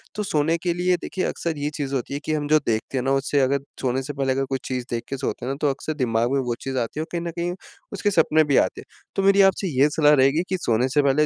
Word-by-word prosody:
तो 210 Hz, -, -2 dB
सोने 160 Hz, -2 st, +1 dB
के 175 Hz, -1 st, +1 dB
लिए 180 Hz, +1 st, +1 dB
देखिए 185 Hz, -, -3 dB
अक्सर 165 Hz, -3 st, -3 dB
ये 145 Hz, +1 st, -2 dB
चीज़ 140 Hz, -2 st, -2 dB
होती 130 Hz, +2 st, -3 dB
है 140 Hz, -, -2 dB
कि 155 Hz, -, -1 dB
हम 145 Hz, -1 st, -1 dB
जो 155 Hz, +1 st, +5 dB
देखते 115 Hz, +4 st, -1 dB
हैं 125 Hz, -, 0 dB
ना, 135 Hz, -, +1 dB
उससे 135 Hz, +1 st, +1 dB
अगर 135 Hz, +1 st, +2 dB, 0.2 s
सोने 130 Hz, 0 st, 0 dB
से 145 Hz, +2 st, -5 dB
पहले 135 Hz, -2 st, 0 dB
अगर 135 Hz, 0 st, -1 dB
कोई 135 Hz, -1 st, -1 dB
चीज़ 125 Hz, -2 st, -3 dB
देख 115 Hz, -1 st, -2 dB
के 135 Hz, -, -3 dB
सोते 130 Hz, -2 st, -3 dB
हैं 130 Hz, -, -2 dB
ना, -, -, -2 dB
तो 145 Hz, -, +3 dB
अक्सर 140 Hz, +3 st, -3 dB
दिमाग 120 Hz, -3 st, 0 dB
में 140 Hz, -, +2 dB
वो 120 Hz, -2 st, -2 dB
चीज़ 135 Hz, -1 st, -4 dB
आती 120 Hz, +5 st, -2 dB
है -, -, 0 dB
और -, -, -10 dB
कहीं 170 Hz, -1 st, -2 dB
न 170 Hz, -, -3 dB
कहीं 175 Hz, +1 st, -1 dB, 0.4 s
उसके 205 Hz, +1 st, 0 dB
सपने 160 Hz, -2 st, +4 dB
भी 145 Hz, -3 st, +2 dB
आते -, -, +1 dB
हैं। -, -, -16 dB, 0.3 s
तो 195 Hz, -, 0 dB
मेरी 195 Hz, 0 st, +5 dB
आपसे 195 Hz, 0 st, +3 dB
ये 145 Hz, +2 st, +6 dB
सलाह 150 Hz, 0 st, +4 dB
रहेगी 135 Hz, +4 st, +3 dB
कि, 185 Hz, -, 0 dB
सोने 120 Hz, -5 st, +1 dB
से 145 Hz, +3 st, +3 dB
पहले 140 Hz, +2 st, +3 dB
145 Hz, 300 wpm, -23 LUFS, 130-165 Hz, 0.4 s, ये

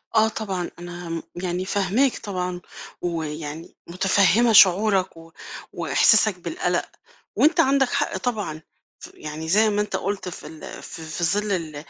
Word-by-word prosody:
آه، 220 Hz, 0 st, +5 dB
طبعًا، 195 Hz, -5 st, -4 dB
أنا، 175 Hz, -1 st, -8 dB
م 165 Hz, -1 st, -4 dB
يعني، 180 Hz, +1 st, -3 dB
فاهماك 205 Hz, +7 st, +1 dB
طبعًا، 180 Hz, -3 st, -4 dB, 0.4 s
ويعني 160 Hz, -2 st, -5 dB
متفهّمة 195 Hz, +6 st, +3 dB
شعورك 190 Hz, -2 st, +5 dB
و 165 Hz, 0 st, -14 dB, 0.4 s
وإحساسك 215 Hz, -4 st, +4 dB
بالقلَق، 340 Hz, -, -2 dB, 0.5 s
وأنت 330 Hz, +3 st, +4 dB
عندك 270 Hz, -3 st, +3 dB
حق 285 Hz, +1 st, -1 dB
طبعًا، 205 Hz, -10 st, -3 dB, 0.4 s
ف -, -, -11 dB
يعني، 155 Hz, +1 st, -7 dB
زي 215 Hz, +4 st, +4 dB
ما 205 Hz, -, 0 dB
أنت 210 Hz, -, -1 dB
قُلت 195 Hz, -2 st, -3 dB
في 180 Hz, -, -8 dB
ال 155 Hz, 0 st, -10 dB
ف -, -, -9 dB
في 160 Hz, +2 st, -4 dB
ظِل 205 Hz, +4 st, +1 dB
ال 160 Hz, -5 st, -3 dB
185 Hz, 145 wpm, -23 LUFS, 165-215 Hz, 0.5 s, آه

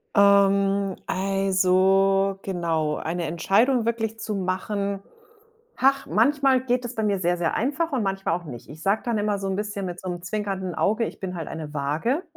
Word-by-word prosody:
Ähm, 200 Hz, -1 st, +4 dB
also, 195 Hz, 0 st, +2 dB
genau. 165 Hz, -5 st, -1 dB
Eine 170 Hz, +1 st, -3 dB
Entscheidung 220 Hz, -, +2 dB
wirklich 225 Hz, -1 st, -1 dB
zu 215 Hz, -, -4 dB
machen, 195 Hz, +1 st, -2 dB, 0.8 s
hach, 275 Hz, +1 st, +3 dB
manchmal 265 Hz, -, +3 dB
geht 250 Hz, 0 st, 0 dB
es 240 Hz, +1 st, -6 dB
bei 220 Hz, -, -1 dB
mir 200 Hz, -2 st, +1 dB
sehr, 175 Hz, 0 st, +1 dB
sehr 170 Hz, -1 st, 0 dB
einfach 290 Hz, +7 st, -1 dB
und 260 Hz, -4 st, 0 dB
manchmal 195 Hz, -3 st, -1 dB
auch 175 Hz, -, -16 dB
nicht. 125 Hz, -6 st, -9 dB
Ich 155 Hz, +2 st, -11 dB
sage 200 Hz, +3 st, +2 dB
dann 235 Hz, -3 st, 0 dB
immer 205 Hz, -1 st, 0 dB
so 195 Hz, -, -3 dB
'n 190 Hz, -, -1 dB
bisschen 205 Hz, -2 st, -3 dB
mit 180 Hz, 0 st, -5 dB
so 185 Hz, -, -5 dB
'nem 175 Hz, -1 st, -5 dB
zwinkernden 195 Hz, -2 st, -3 dB
Auge, 220 Hz, +3 st, +1 dB
ich -, -, -7 dB
bin 185 Hz, -2 st, -5 dB
halt 165 Hz, -, -5 dB
eine 155 Hz, -2 st, -7 dB
Waage. 155 Hz, -, -1 dB
195 Hz, 185 wpm, -24 LUFS, 180-220 Hz, 0.8 s, Ähm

